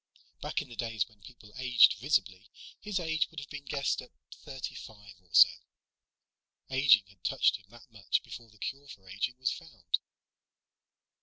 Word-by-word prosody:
Back - - -2
in - - -16
the 120 - -11
days 115 -5 -1
when 105 -2 -24
people 105 -4 -15
aged 125 -3 +6
visibly, 105 -6 0 0.3
his 205 -2 -2
age 160 -3 0
would 160 - -8
have 140 - -10
been 145 -1 -7
guessed 140 0 -1
at 125 - -13 0.3
thirty 135 -4 -7
five 105 -2 -11
or 90 - -30
so. - - +9 1.2
Aging 130 -6 +5
had 95 -2 -23
touched - - +2
him 100 - -22
that 120 +1 -17
much 105 -3 -1
before 115 -2 -10
the 105 - -21
cure 140 +6 -5
for 100 -8 -13
aging 105 +7 -3
was 130 0 0
found. 125 - -3
120 Hz, 170 wpm, -30 LUFS, 105-140 Hz, 1.2 s, so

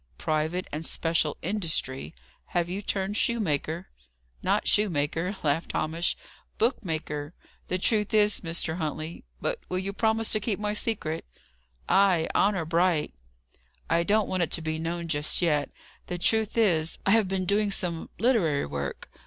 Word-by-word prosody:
"Private 160 +4 -1
and 155 +2 -3
special 165 -2 0
industry! 155 - -2 0.3
Have 175 -1 0
you 195 +2 -3
turned 195 0 -1
shoemaker?" 175 -7 0 0.5
"Not - - +1
shoemaker," 170 -1 +1
laughed 155 +2 0
Hamish. 165 +2 0 0.4
"Book 235 +1 +1
maker. 155 -2 -4 0.3
The 185 - 0
truth 210 +2 +1
is, 210 -1 +5
Mr. 165 -1 0
Huntley 155 - -4
But - - -1
will 185 - 0
you 195 +2 -2
promise 220 +1 +1
to 215 - +4
keep 210 -1 -1
my 210 0 -1
secret?" 205 -7 -1 0.6
"Ay. 190 -4 +4
Honour 195 -4 +2
bright." 165 -1 +2 0.8
"I 165 +1 +4
don't 210 +4 +2
want 185 -1 0
it 170 - +1
to 170 - +1
be 160 0 -2
known 170 +1 -3
just 150 -2 +1
yet. 150 -5 +2 0.4
The 180 - -3
truth 220 +5 +2
is, 170 -8 +2
I 195 - +4
have 220 -2 +5
been 190 0 -1
doing 205 +2 +2
some 175 -4 -2
literary 200 - +2
work. 70 -2 -4
175 Hz, 155 wpm, -27 LUFS, 160-205 Hz, 0.8 s, is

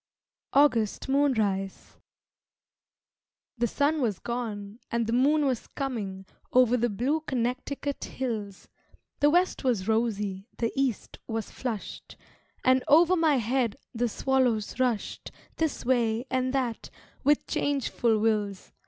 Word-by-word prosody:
August 250 -7 +3
Moonrise 220 -9 0 1.6
The 240 - +2
sun 295 +5 +1
was 215 -7 0
gone, 220 -2 -5
and 235 0 0
the 225 - -2
moon 290 +4 +3
was 255 -4 -1
coming 205 -8 -4 0.3
Over 250 -1 +5
the 240 0 +1
blue 255 +9 0
Connecticut 265 +1 -3
hills; 215 -7 -4 0.5
The 290 - +5
west 355 +2 +2
was 230 -7 0
rosy, 210 -3 -1
the 230 -1 0
east 270 -5 -2
was 225 -2 -4
flushed, 230 -6 -6 0.5
And 255 0 +4
over 335 +5 +6
my 320 -4 +3
head 240 -1 0 0.2
the 240 0 0
swallows 250 -3 0
rushed 245 -5 -1 0.3
This 320 -6 -1
way 235 -2 +1
and 255 0 +1
that, 255 -4 -2 0.3
with 290 +2 +3
changeful 265 -5 0
wills. 210 -3 -1
245 Hz, 120 wpm, -27 LUFS, 220-270 Hz, 1.6 s, over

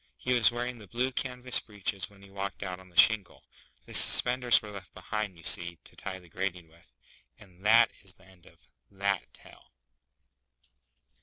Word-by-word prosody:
He 125 - -2
was 120 -1 +5
wearing 120 0 -5
the 105 - -13
blue 125 +7 -2
canvas 125 -1 +1
breeches 100 -2 -2
when 100 -1 -20
he 100 - -16
walked 100 +1 -6
out 90 -2 -6
on 95 0 -17
the 85 - -19
shingle. 105 -5 +4 0.4
The - - -13
suspenders 125 -1 +5
were 105 - -11
left 100 -2 -11
behind, 100 0 -5
you 85 - -16
see, 85 +1 0
to - - -13
tie 95 -1 -7
the 90 -2 -17
grating 90 -1 -5
with; 80 -5 -24 0.5
and 95 -2 -19
that 115 +1 +6
is 95 0 -8
the 95 - -23
end 95 -2 -21
of 85 - -22 0.2
that 100 -1 -3
tale. - - -18
100 Hz, 180 wpm, -28 LUFS, 90-115 Hz, 0.5 s, that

